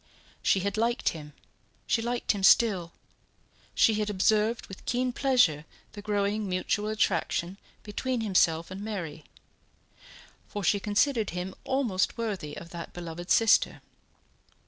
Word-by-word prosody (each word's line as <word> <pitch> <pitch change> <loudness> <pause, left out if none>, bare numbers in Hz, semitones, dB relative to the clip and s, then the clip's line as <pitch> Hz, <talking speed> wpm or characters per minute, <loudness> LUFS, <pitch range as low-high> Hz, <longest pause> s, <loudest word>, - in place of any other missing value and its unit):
She 190 - +2
had 200 +3 -2
liked 235 +2 +1
him, 150 -2 -9 0.5
she 230 - +1
liked 240 +1 -1
him 205 - -3
still; 190 -4 +4 0.8
she 220 -2 +4
had 210 0 -1
observed 215 +3 +1
with 195 - -11
keen 250 +1 0
pleasure 245 - +3 0.3
the 205 - -9
growing 205 0 -1
mutual 205 +3 -1
attraction 190 -2 -1 0.2
between 240 +4 -2
himself 175 -5 +2
and 190 +1 -6
Mary, 175 -8 -5 1.2
for 205 - -5
she 200 +2 +3
considered 215 +3 +1
him 185 +1 -4
almost 240 -9 0
worthy 200 -10 -4
of 170 - -10
that 170 -1 -8
beloved 175 0 -7
sister. 225 -1 +4
205 Hz, 130 wpm, -28 LUFS, 180-225 Hz, 1.2 s, still